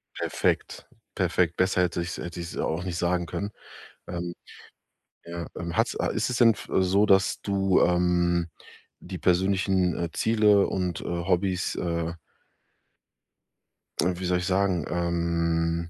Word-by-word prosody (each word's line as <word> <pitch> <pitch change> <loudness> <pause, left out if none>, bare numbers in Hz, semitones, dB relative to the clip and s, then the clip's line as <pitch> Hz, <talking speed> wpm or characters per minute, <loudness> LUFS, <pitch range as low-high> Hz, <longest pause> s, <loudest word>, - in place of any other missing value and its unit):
Perfekt. - - -1 0.3
Perfekt. 85 -2 +1
Besser 95 0 +2
hätte 85 -1 -1
ich's 85 0 -4
hätte 85 0 -6
ich's 85 0 -6
auch 80 +3 -1
nicht 90 -2 -4
sagen 90 0 0
können, 100 +4 -4 0.6
ähm, 85 0 -4 0.9
ja, 85 0 -6
ähm, 85 -1 -5
hat's - - +1
a - - 0
ist - - -1
es 125 - -1
denn 115 -2 +7
f 105 - -11
äh, - - +2
so, 100 +3 +3
dass 95 -1 +3
du, 95 -2 +2
ähm, 85 -1 +2 0.5
die 90 0 -7
persönlichen, 95 0 +2
äh, 85 -1 -2
Ziele 105 -3 +3
und, 90 -3 -2
äh, - - -8
Hobbys, 90 +1 0
äh 85 -1 -2 1.9
Äh, 90 +2 +2
wie 95 - -4
soll 90 0 +2
ich 90 - -3
sagen, 95 -4 +1
ähm 85 -1 0
90 Hz, 145 wpm, -26 LUFS, 85-95 Hz, 1.9 s, denn